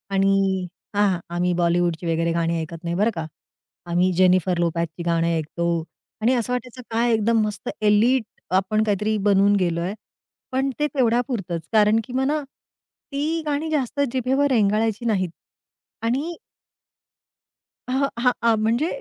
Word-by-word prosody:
आणि 195 Hz, -1 st, +2 dB, 0.3 s
हां, 200 Hz, -3 st, +2 dB, 0.2 s
आम्ही 180 Hz, +1 st, +1 dB
बॉलिवूडची 175 Hz, 0 st, +1 dB
वगैरे 165 Hz, 0 st, +1 dB
गाणी 170 Hz, 0 st, 0 dB
ऐकत 165 Hz, +1 st, -8 dB
नाही 170 Hz, 0 st, -2 dB
बरं 210 Hz, +5 st, +2 dB
का, 165 Hz, -1 st, -3 dB, 0.6 s
आम्ही 175 Hz, +2 st, +2 dB
जेनिफर 185 Hz, 0 st, +3 dB
लोपेजची 170 Hz, 0 st, -1 dB
गाणे 170 Hz, 0 st, +1 dB
ऐकतो. 170 Hz, +1 st, -1 dB, 0.4 s
आणि 235 Hz, +4 st, +3 dB
असं 245 Hz, 0 st, -1 dB
वाटायचं 250 Hz, 0 st, -5 dB
काय 230 Hz, +1 st, +2 dB
एकदम 225 Hz, +1 st, +2 dB
मस्त 210 Hz, -1 st, -5 dB
एलीट 220 Hz, +4 st, +4 dB, 0.3 s
आपण 205 Hz, +3 st, +2 dB
काहीतरी 210 Hz, +1 st, 0 dB
बनवून 200 Hz, 0 st, +4 dB
गेलो 170 Hz, -2 st, 0 dB
आहे. 185 Hz, +3 st, -2 dB, 0.6 s
पण 265 Hz, +1 st, 0 dB
ते 295 Hz, -, +2 dB
तेवढ्यापुरतंच 240 Hz, -, 0 dB
कारण 215 Hz, 0 st, +5 dB
की 250 Hz, -, -10 dB
मला 275 Hz, +4 st, +1 dB, 0.7 s
ती 305 Hz, +4 st, -1 dB
गाणी 300 Hz, +2 st, -1 dB
जास्त 285 Hz, -2 st, -1 dB
जिभेवर 265 Hz, +2 st, +2 dB
रेंगाळायची 220 Hz, 0 st, +1 dB
नाहीत. 190 Hz, -6 st, +1 dB, 0.7 s
आणि 275 Hz, +9 st, -1 dB, 1.5 s
अ, -, -, -4 dB, 0.3 s
हां, 250 Hz, +1 st, +4 dB, 0.2 s
आ, 225 Hz, -, +4 dB
म्हणजे 225 Hz, +7 st, +1 dB
210 Hz, 140 wpm, -23 LUFS, 175-245 Hz, 1.5 s, कारण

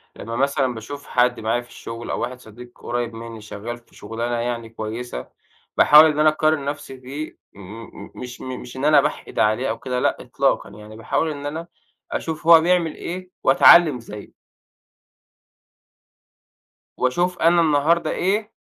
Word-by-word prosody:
لمّا 115 Hz, +2 st, -6 dB
مثلًا 135 Hz, -1 st, +1 dB
باشوف 140 Hz, +6 st, -9 dB
حد 125 Hz, 0 st, +2 dB
معايا 115 Hz, +2 st, 0 dB
في 120 Hz, -, -18 dB
الشغل 115 Hz, +1 st, -8 dB
أو -, -, -2 dB
واحد 125 Hz, +1 st, -4 dB
صديق 120 Hz, +1 st, -13 dB
قريّب 120 Hz, -1 st, -4 dB
مني 115 Hz, -1 st, -9 dB
شغال 105 Hz, +3 st, -7 dB
في 120 Hz, -, -24 dB
شغلانة 115 Hz, +3 st, -4 dB
يعني 115 Hz, -1 st, -3 dB
كويسة، 115 Hz, +2 st, -6 dB, 0.5 s
باحاول 150 Hz, +2 st, +8 dB
إن 150 Hz, -1 st, +1 dB
أنا 155 Hz, 0 st, +6 dB
أقارن 155 Hz, -1 st, +1 dB
نفسي 140 Hz, -2 st, -5 dB
بيه 140 Hz, +5 st, -7 dB, 0.2 s
م 105 Hz, +4 st, -10 dB, 0.2 s
م -, -, -17 dB
مش 125 Hz, 0 st, -8 dB
م 130 Hz, 0 st, -6 dB
مش 125 Hz, +1 st, -10 dB
إن 135 Hz, -, -2 dB
أنا 150 Hz, -2 st, +6 dB
باحقد 150 Hz, +2 st, -4 dB
عليه 110 Hz, +5 st, +2 dB
أو -, -, -3 dB
كده، 130 Hz, -2 st, -3 dB
لأ -, -, +1 dB
إطلاقًا -, -, 0 dB
يعني 105 Hz, 0 st, -12 dB
باحاول 155 Hz, +7 st, -1 dB
إن 145 Hz, -1 st, -7 dB
أنا 160 Hz, +4 st, -5 dB, 0.4 s
أشوف 160 Hz, 0 st, -4 dB
هو 165 Hz, -1 st, +9 dB
بيعمل 170 Hz, -2 st, +1 dB
إيه 185 Hz, +1 st, -6 dB
وأتعلِّم 150 Hz, 0 st, +6 dB
زيه. 105 Hz, -3 st, -11 dB, 2.7 s
وأشوف 175 Hz, +8 st, 0 dB
أنا 170 Hz, +1 st, +4 dB
النهاردة 155 Hz, +1 st, +2 dB
إيه 210 Hz, +4 st, -1 dB
130 Hz, 160 wpm, -22 LUFS, 115-155 Hz, 2.7 s, هو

